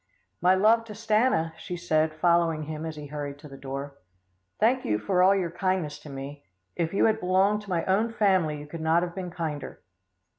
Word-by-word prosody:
"My 185 +1 +5
love 220 +4 +4
to 215 - -8
Stanna," 215 -8 +1
she 180 - -5
said, 160 -2 +1
following 170 -1 +2
him 155 +1 -5
as 160 - -6
he 150 -1 -8
hurried 145 -1 -6
to 150 +1 -12
the 135 - -11
door. 140 +1 -7 0.6
"Thank 250 +4 +3
you 105 - 0
for 180 - +1
all 190 +2 +6
your 180 -4 -1
kindness 175 -5 -1
to 150 - -12
me. 140 +1 -8 0.3
If 165 -1 -1
you 195 - +2
had 220 0 +2
belonged 190 +3 +2
to 205 - -13
my 170 -3 0
own 210 +5 +1
family, 185 -9 +2
you 145 - -8
could 160 +2 -8
not 160 +2 +3
have 175 -1 -4
been 185 -1 -5
kinder." 160 -5 -5
170 Hz, 210 wpm, -27 LUFS, 150-190 Hz, 0.6 s, all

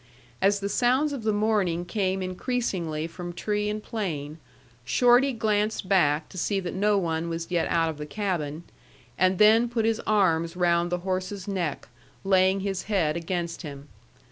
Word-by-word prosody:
As 200 +1 +3
the 200 - -1
sounds 255 +8 +2
of 270 - -4
the 220 0 +1
morning 205 -5 +1
came 190 0 -1
increasingly 185 -6 -2
from 175 +1 -7
tree 210 +3 -1
and 210 0 -4
plain, 160 -8 -4 0.4
Shorty 245 - +4
glanced 215 -3 0
back 155 -5 +2
to 185 - -7
see 200 +3 0
that 180 -2 -5
no 205 +2 +2
one 165 -2 -1
was 165 +1 -5
yet 175 -2 +1
out 165 -1 +2
of 155 -2 -5
the 150 - -5
cabin, 170 -5 -3 0.5
and 185 +1 +2
then 220 +3 +5
put 230 -2 0
his 225 0 +1
arms 170 -5 +2
round 175 -1 +2
the 180 0 -1
horse's 185 +1 -3
neck, 180 -7 -3 0.4
laying 190 0 +3
his 195 -1 -3
head 165 -7 +1
against 170 0 -3
him. 145 -3 -9
185 Hz, 170 wpm, -26 LUFS, 170-210 Hz, 0.5 s, then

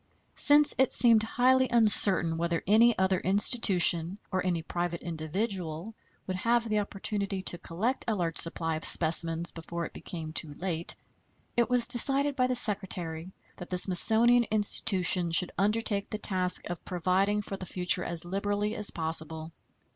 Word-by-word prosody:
Since 290 0 +4
it 265 - +2
seemed 230 -3 +4
highly 255 +3 +1
uncertain 195 -7 +4
whether 170 0 -3
any 225 +3 +3
other 190 -1 0
institution, 190 -3 +3
or 185 -1 -2
any 175 -3 -3
private 175 0 -5
individual, 170 +2 -5 0.3
would 185 -1 -5
have 230 +3 -1
the 215 -1 -1
opportunity 200 -1 -5
to 175 - -1
collect 220 +13 -4
a 225 - -1
large 170 -4 -4
supply 165 -1 -2
of 155 - -9
specimens 165 +1 +1
before 170 +1 -7
it - - -11
became 160 -3 -9
too 150 -2 -4
late, 170 -1 -4 0.6
it 235 0 0
was 245 -1 +4
decided 275 +3 +4
by 255 -2 0
the 255 - -2
Secretary 185 -6 -2 0.3
that 180 - -11
the 180 - -3
Smithsonian 225 +7 +2
Institution 190 -4 +3
should 170 +2 +1
undertake 205 0 -1
the 215 - -5
task 185 -3 -2
of 175 -1 -8
providing 190 +4 -2
for 200 - -7
the 185 -1 -9
future 180 0 0
as 170 -1 -7
liberally 205 +3 -3
as 210 - -1
possible. 160 0 -6
190 Hz, 155 wpm, -27 LUFS, 170-220 Hz, 0.6 s, Since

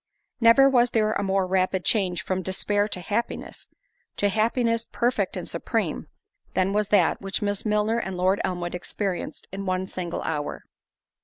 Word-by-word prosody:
Never 235 +3 +7
was 245 -2 +4
there 215 -2 +1
a - - -1
more 195 -1 +1
rapid 185 0 0
change 185 -5 +1
from 185 0 -1
despair 205 +3 0
to 195 - -3
happiness—to 205 - -4
happiness 230 +2 +1
perfect 245 +2 0
and - - -5
supreme—than 190 +1 -3
was 210 0 +1
that, 195 -5 +3
which 195 +1 -3
Miss 205 +1 -1
Milner 210 +2 +1
and 190 -4 -4
Lord 185 +2 +2
Elmwood 175 -1 -2
experienced 185 +1 -4
in 195 +1 -5
one 185 0 0
single 180 -2 -4
hour. 150 -2 -3
195 Hz, 150 wpm, -25 LUFS, 185-220 Hz, -, Never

